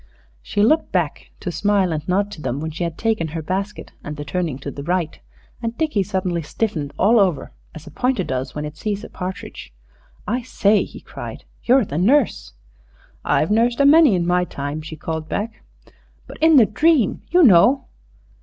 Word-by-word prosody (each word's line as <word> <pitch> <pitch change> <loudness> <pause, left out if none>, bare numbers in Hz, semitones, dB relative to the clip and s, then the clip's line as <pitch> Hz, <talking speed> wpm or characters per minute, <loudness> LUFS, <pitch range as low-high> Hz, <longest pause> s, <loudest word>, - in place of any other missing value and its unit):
She 205 - -1
looked 310 +9 +2
back - - -2
to 180 - -3
smile 195 +1 +1
and 155 0 -5
nod 200 +3 0
to 155 - -9
them 130 0 -3
when 160 +1 -4
she 165 +3 -4
had 170 -1 -4
taken 220 -7 0
her 160 +1 -5
basket 195 +5 -4
and 150 0 -6
the 145 - -6
turning 170 -5 -2
to 140 +1 -7
the 140 - -8
right, 170 +1 -2 0.4
and 230 0 -4
Dickie 305 -10 0
suddenly 185 -3 -2
stiffened 155 -3 -3
all 220 +4 +4
over, 180 -8 +1 0.2
as 160 0 -10
a 165 - -11
pointer 250 -6 0
does 130 -3 -4
when 150 0 -3
it 150 0 -7
sees 205 +3 -3
a - - -9
partridge. 180 - -7 0.6
"I 245 +4 -1
say," 210 -4 +2
he - - -12
cried, - - -9 0.2
"you're 255 -1 +4
the 150 -3 -3
nurse 250 - +2 0.4
" - - -32 0.3
"I've 160 - +1
nursed 235 +3 +2
a 280 - +5
many 295 - +6
in 175 -1 0
my 180 +1 +2
time," 145 -2 -5
she 160 +1 -8
called 160 0 -5
back. 215 +2 -4 0.6
"But - - -11
in 320 0 +6
the 245 -6 +8
dream... 285 - +2
you 355 +1 +5
know." 240 - +5
185 Hz, 195 wpm, -21 LUFS, 160-225 Hz, 0.6 s, the